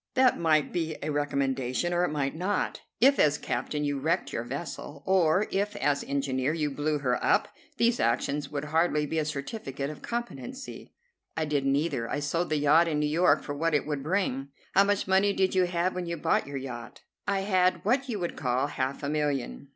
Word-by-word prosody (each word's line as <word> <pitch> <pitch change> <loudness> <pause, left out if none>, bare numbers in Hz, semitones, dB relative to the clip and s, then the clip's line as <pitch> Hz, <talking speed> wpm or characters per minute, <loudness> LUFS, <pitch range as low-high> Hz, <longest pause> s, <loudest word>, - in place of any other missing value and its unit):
"That 255 -1 +4
might 155 -3 +2
be 160 -2 -2
a 155 - -1
recommendation, 140 +1 0
or 175 0 +2
it - - +1
might 140 -2 -1
not. 185 +5 -1 0.2
If, 275 +4 +5
as 150 -1 +4
captain, 150 0 -2
you 145 -1 -1
wrecked 145 -1 0
your 115 - -2
vessel, 140 +2 -6
or 185 +1 +3
if, 200 +2 -1
as 140 0 +1
engineer, 140 0 0
you 150 -3 -1
blew 150 +2 0
her 125 -3 -1
up, - - +3 0.3
these 235 +1 +2
actions 140 +4 0
would 145 -1 -3
hardly 155 0 +2
be 160 +2 -1
a 155 - 0
certificate 140 - -4
of 155 - -11
competency." 240 +3 -6 0.5
"I 160 - +1
did 145 -2 0
neither. 140 -4 0
I 145 - -1
sold 165 +4 -1
the 155 - +1
yacht 150 +4 +5
in 155 -2 0
New 150 - +1
York 165 +5 +3
for 145 - -4
what 155 +2 0
it 145 - +1
would 150 -2 -2
bring." 150 -5 -1 0.3
"How 195 +1 +6
much 205 -1 0
money 195 +2 +3
did 190 -1 +1
you 185 -1 +4
have 175 +1 0
when 180 -1 -4
you 170 0 -3
bought 150 - +1
your 140 -1 -4
yacht?" 120 -3 -7 0.3
"I 200 -1 +1
had 185 -2 +2
what 260 +5 +1
you 225 - -1
would 175 -3 -3
call 125 0 0
half 135 -1 -3
a - - -1
million." 145 - -2
150 Hz, 205 wpm, -28 LUFS, 140-180 Hz, 0.5 s, How